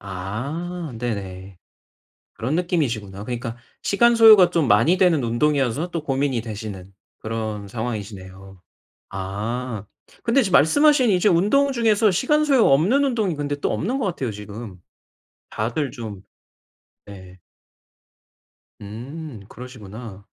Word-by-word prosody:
아 140 - -5
네네 95 -5 -5 0.8
그런 125 +6 -3
느낌이시구나. 120 - -2
그러니까 120 0 -5 0.2
시간 235 +4 +3
소요가 215 -5 +8
좀 165 -6 +1
많이 115 - +4
되는 175 -7 +3
운동이어서 140 +5 0
또 165 -3 -4
고민이 135 -3 0
되시는 105 -4 -8 0.2
그런 110 -2 -4
상황이시네요. 100 -4 -7 0.5
아 105 +4 -4 0.4
근데 235 +4 +3
지금 190 -6 -2
말씀하신 280 - +4
이제 185 +2 +3
운동 210 +11 +3
중에서 225 -4 +3
시간 300 - +2
소요 270 -5 +4
없는 190 - +3
운동이 220 - 0
근데 145 0 -2
또 - - -1
없는 245 +10 -2
것 250 - -1
같아요 135 - -2
지금. 105 -1 -9 0.7
다들 120 +6 -2
좀 110 -7 -8 0.8
네. 95 -2 -12 1.4
음. 120 +5 -8
그러시구나. 110 -4 -10
125 Hz, 270 characters per minute, -22 LUFS, -, 1.4 s, 소요가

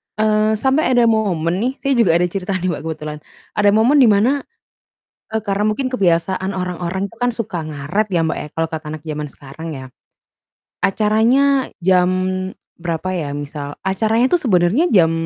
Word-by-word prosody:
Eee, 215 0 +2
sampai 265 +3 +2
ada 240 - +5
momen 180 -5 0
nih 250 +4 0
saya 275 - +1
juga 170 -7 +4
ada 175 - +3
cerita 190 +2 -2
nih 185 0 -1
Mbak, 155 - -4
kebetulan 150 -1 -5 0.3
ada 205 0 +3
momen 235 +7 +4
di 250 - +7
mana, 210 +5 +4 1.0
e 220 - -1
karena 200 +1 0
mungkin 255 +5 -1
kebiasaan 185 -1 +1
orang-orang 180 +1 -3
itu 230 - -10
kan 245 - +3
suka 225 -7 -4
ngaret 155 +8 -2
ya 170 -3 +1
Mbak, 160 - -1
ya, - - -7
kalau 165 0 +1
kata 155 -1 -5
anak 150 - -21
zaman 150 -1 -4
sekarang 145 +4 -10
ya. 130 - -8 1.0
Acaranya 235 +7 +2 0.2
jam 180 -1 +4 0.7
berapa 175 +2 -3
ya 155 -6 -3
misal, 145 0 -6
acaranya 220 - +1
itu 350 - +4
sebenarnya 210 - +2
jam 165 -6 +4
190 Hz, 170 wpm, -19 LUFS, 165-220 Hz, 1.0 s, di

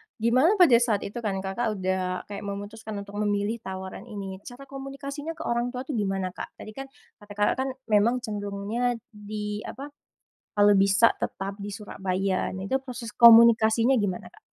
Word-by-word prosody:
gimana 255 - +3
pada 320 - +6
saat 225 -4 +1
itu 205 +4 -5
kan 195 -4 -2
Kakak 215 +3 -2
udah 185 -1 -2
kayak 200 -1 -7
memutuskan 205 +2 -6
untuk 205 +1 -8
memilih 205 +2 0
tawaran 190 +2 -7
ini, 195 -3 -6
cara 250 +3 -10
komunikasinya 275 +3 -7
ke - - -7
orang 240 +1 -1
tua 250 - -3
tuh 270 - -6
gimana, 195 -6 -1
Kak? - - -8
Tadi 215 - -10
kan 270 +4 -8 0.3
kata 205 0 -15
Kakak 205 0 +2
kan 265 - 0 0.2
memang 235 +4 +3
cenderungnya 210 +4 -2 0.2
di 210 0 -5
apa, 280 +3 -8 0.7
kalau 205 0 +6
bisa 195 +3 +4
tetap 195 +1 -4
di 205 - -5
Surabaya 195 -2 -2
nah 190 +1 -5
itu 265 - +1
proses 240 -4 -7
komunikasinya 230 +1 +7
gimana, 205 -7 -1
Kak? - - -16
210 Hz, 170 wpm, -26 LUFS, 200-240 Hz, 0.7 s, komunikasinya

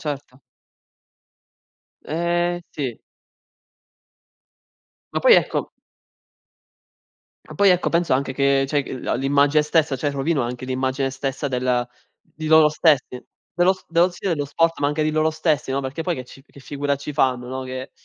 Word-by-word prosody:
Certo. 140 -3 -6 1.6
Eh, 175 +2 -1
sì. 130 -6 -5 2.1
Ma - - 0
poi, - - +7
ecco - - +1 1.8
Ah - - -9
poi 200 -1 +5
ecco, 180 0 +2
penso 170 -4 +1
anche 135 0 0
che 140 0 +2
cioè 145 -1 +1
g 130 - -7
la - - -1
l'immagine 145 +2 +3
stessa 150 -2 +1
cioè 145 +3 -1
rovino 140 0 0
anche 125 +2 -5
l'immagine 130 +1 -1
stessa 135 +1 -3
della 125 -1 0 0.4
di 155 0 -9
loro 155 -1 +6
stessi, 150 -5 +1 0.3
dello 175 +2 +3
s 190 - -14
dello 170 +2 +3
stile, 175 -1 -2
lo 145 - -2
sport, 165 +4 0
ma 145 - +1
anche 150 +2 0
di 155 - +1
loro 155 +1 +1
stessi, 155 -3 -1
no, 135 - 0
perché 135 +4 -5
poi 175 - 0
che 130 -3 -7
ci 135 - -15
che 140 - -16
figura 145 0 -2
ci 140 +2 -7
fanno, 125 -2 0
no? 130 0 -4
Che 130 +1 -6
145 Hz, 160 wpm, -22 LUFS, 130-160 Hz, 2.1 s, poi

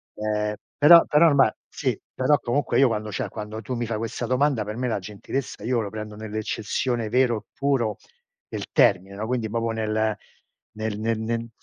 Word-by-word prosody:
ehm, 105 0 -1 0.2
però 170 +3 +8
però 160 +3 +5
ormai 140 -6 +5 0.2
sì, - - -2 0.2
però 130 +3 +3
comunque 130 +3 0
io 135 - +6
quando 110 -1 -2
cioè, - - -3
quando 110 0 -6
tu 125 +4 -4
mi 120 0 -2
fai 110 -1 -2
questa 115 +2 -3
domanda, 130 -2 +1
per 105 +1 -5
me 125 - -1
la 105 - -1
gentilezza 105 +4 -5
io 120 +1 +1
la 100 - -4
prendo 105 0 -7
nell'eccezione 110 +2 -2
vero 125 -1 +3
e 105 - -9
puro 135 -6 0 0.5
del - - -4
termine, 95 +2 +3
no, 105 +2 -4
quindi 120 -3 -1
proprio 115 0 -1
nel 110 -1 0 0.6
nel 110 -1 -3
nel 115 0 0
nel 115 +1 -2
110 Hz, 185 wpm, -24 LUFS, 110-125 Hz, 0.6 s, però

